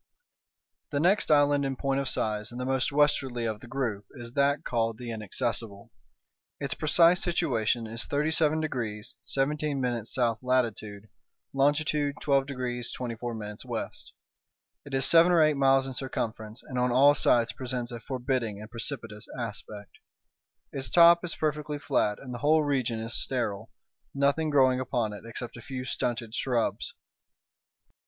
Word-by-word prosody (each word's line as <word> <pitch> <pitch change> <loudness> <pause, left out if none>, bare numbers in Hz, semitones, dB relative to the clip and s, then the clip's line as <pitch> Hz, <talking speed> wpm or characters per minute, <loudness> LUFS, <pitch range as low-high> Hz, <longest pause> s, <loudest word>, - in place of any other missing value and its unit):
The 140 - -1
next 185 +7 +3
island 145 -1 +4
in 135 -1 -2
point 135 +1 -1
of 135 -1 -1
size, 105 0 -1
and 120 - -7
the 125 - -3
most 130 +1 0
westwardly 135 -4 +1
of 110 -2 -2
the 120 - -12
group, 115 -6 -3
is 120 -2 -8
that 140 +2 +2
called 115 -2 -1
the 120 0 -6
Inaccessible. 110 -1 -3 0.7
Its 140 -2 -1
precise 170 +3 +4
situation 120 - 0
is 115 +2 -4
37 155 +1 +2
degrees 120 -5 -4
17' 145 0 -1
S. 120 -2 -3 0.2
latitude, 110 -5 -1 0.5
longitude 145 +1 +1
12 135 -2 +2
degrees 125 -3 -4
24' 120 -1 -5 0.3
W. - - -3 1.0
It 140 - -9
is 135 0 +3
seven 170 +1 +7
or 170 - +5
eight 155 0 +4
miles 135 -1 +3
in 135 - -5
circumference, 110 -4 -4
and 125 - -4
on 125 0 +2
all 140 +4 +6
sides 120 -4 +2
presents 125 -1 -4
a 120 - -6
forbidding 125 -4 -2
and 105 0 -10
precipitous 115 -3 -3
aspect. 105 -3 -7 0.7
Its 135 -1 -3
top 170 0 +7
is 175 - -3
perfectly 150 -1 -2
flat, 140 -8 0
and 130 -2 -9
the 120 - -6
whole 155 +3 +3
region 130 -6 0
is 115 +1 -4
sterile, 115 -4 -2 0.5
nothing 140 +3 +2
growing 130 -3 +4
upon 120 -4 -1
it 105 - -10
except 120 +1 -7
a - - -9
few 130 +1 -6
stunted 120 -3 -3
shrubs. 120 -2 -1
130 Hz, 150 wpm, -28 LUFS, 115-145 Hz, 1.0 s, seven